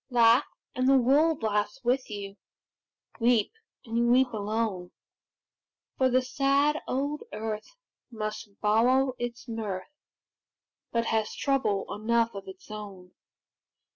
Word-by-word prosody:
Laugh, 240 +1 +5 0.3
and 255 +1 +1
the 270 - +6
world 285 +3 +3
laughs 210 -1 0
with 250 +2 +1
you; 200 -2 -6 0.8
Weep, 235 -2 +3 0.3
and 230 0 -3
you 235 - +3
weep 250 +1 +4
alone; 210 -3 -2 1.1
For 260 -1 +3
the 255 +1 +3
sad 280 +3 +2
old 285 +3 -1
earth 215 - -5 0.3
must 215 -2 -6
borrow 250 +5 +3
its 240 +1 -5
mirth, 220 +1 -5 1.0
But 230 0 0
has 220 -1 0
trouble 265 -8 0
enough 230 +2 +1
of 195 -1 -8
its 190 +2 -12
own. 195 -4 -9
230 Hz, 120 wpm, -28 LUFS, 210-255 Hz, 1.1 s, the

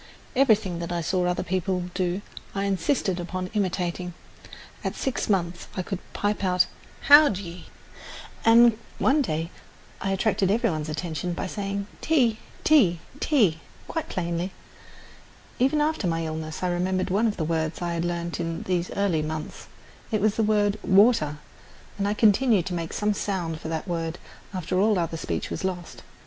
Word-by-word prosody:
Everything 215 -9 +3
that 170 0 -4
I 175 -1 -1
saw 180 +2 0
other 180 - 0
people 185 -1 -1
do 185 +1 -1 0.3
I 195 - 0
insisted 195 - 0
upon 185 +1 -4
imitating. 180 -3 -1 0.7
At - - -2
six 265 -4 -2
months 175 -3 0
I 185 - 0
could 195 0 -4
pipe 205 0 -1
out 185 -1 +3 0.4
"How 290 +1 +8
d'ye," 180 -3 -6 0.8
and 230 0 +6 0.2
one 290 +3 +3
day 165 - -2 0.5
I 195 - -1
attracted 195 0 +1
every 230 +1 +2
one's 155 -1 -3
attention 160 +2 -3
by 170 - -3
saying 200 +1 -3 0.2
"Tea, 245 -9 +2 0.2
tea, 210 - +5 0.2
tea" 210 - +3 0.3
quite 325 - -3
plainly. 175 +1 -2 1.1
Even 270 +4 +3
after 300 - +1
my 165 -1 0
illness 155 +1 -5
I 180 - +1
remembered 185 +1 0
one 210 +5 +3
of 215 - -2
the 160 - -1
words 160 0 -1
I 175 -1 -2
had 170 0 -1
learned 170 0 -2
in 165 -1 -3
these 180 -1 -1
early 195 -6 +1
months. 155 0 -5 0.4
It 215 - +2
was 210 +1 +2
the 225 - 0
word 210 -1 +2
"water," 190 -7 +4 0.6
and 200 - +1
I 205 - 0
continued 215 -2 +4
to 190 - -3
make 165 -2 -3
some 210 0 0
sound 180 -6 -2
for - - -6
that 160 +2 -3
word 165 -1 -2 0.3
after 185 -1 -1
all 210 0 +4
other 165 -1 -1
speech - - -3
was - - -4
lost. 180 -2 -4
185 Hz, 165 wpm, -26 LUFS, 170-210 Hz, 1.1 s, How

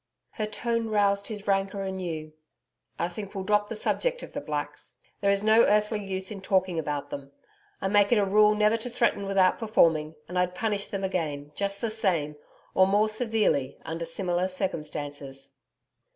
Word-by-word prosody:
Her 215 - -3
tone 230 +1 -1
roused 200 -1 +2
his 210 -2 -6
rancour 195 0 0
anew. 170 -5 -4 0.6
'I 170 - 0
think 195 +2 -8
we'll 190 - -3
drop 210 +1 +2
the 225 - -4
subject - - 0
of - - -10
the - - -3
Blacks; - - -5 0.3
there 200 - +2
is 200 0 +2
no 220 +1 +6
earthly 210 -1 +2
use 190 0 -3
in 200 -2 -6
talking 185 -3 +1
about 145 -2 -3
them, 140 0 -7 0.5
I - - 0
make 205 +1 +4
it 240 - +5
a 205 - +3
rule 210 +2 +5
never 210 +1 +3
to 230 +2 -4
threaten 235 -4 +1
without 190 -2 +3
performing, 160 -8 +2
and 180 +1 -2
I'd 180 0 0
punish 205 0 -1
them 195 -1 -4
again, 150 -6 -2
just 200 +2 -2
the 230 - -1
same 175 -9 0 0.4
or 190 - +5
more 205 +2 +3
severely 215 - +1
under 165 +1 -4
similar 175 +1 -1
circumstances.' 145 -7 -4
195 Hz, 180 wpm, -27 LUFS, 170-210 Hz, 0.6 s, no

